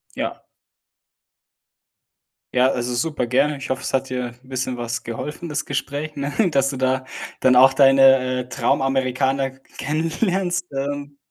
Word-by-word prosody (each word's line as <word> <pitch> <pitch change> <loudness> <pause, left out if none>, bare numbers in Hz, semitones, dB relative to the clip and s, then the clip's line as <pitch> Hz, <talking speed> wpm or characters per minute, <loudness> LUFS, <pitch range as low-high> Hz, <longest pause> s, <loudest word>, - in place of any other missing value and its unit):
Ja. - - -4 2.1
Ja, 130 +1 +4
also, 125 -1 -2
super 130 +1 -1
gerne. 145 +5 +2
Ich 135 - -8
hoffe, 130 - -1
es - - -5
hat 135 0 0
dir 125 -2 -3
'n 130 - -21
bisschen 130 -1 -3
was 120 0 -4
geholfen, 150 +8 -5
das 150 0 -2
Gespräch, 145 +2 -4
ne? 140 0 -2 0.2
Dass 135 -3 +2
du 135 - -4
da 130 0 0 0.3
dann 125 -1 +4
auch 130 +1 +8
deine, 135 -2 +5
äh, 125 - -7
Traumamerikaner 135 0 0 0.3
kennenlernst, 175 +3 -1
ähm, 145 +1 -4
135 Hz, 145 wpm, -22 LUFS, 130-145 Hz, 2.1 s, auch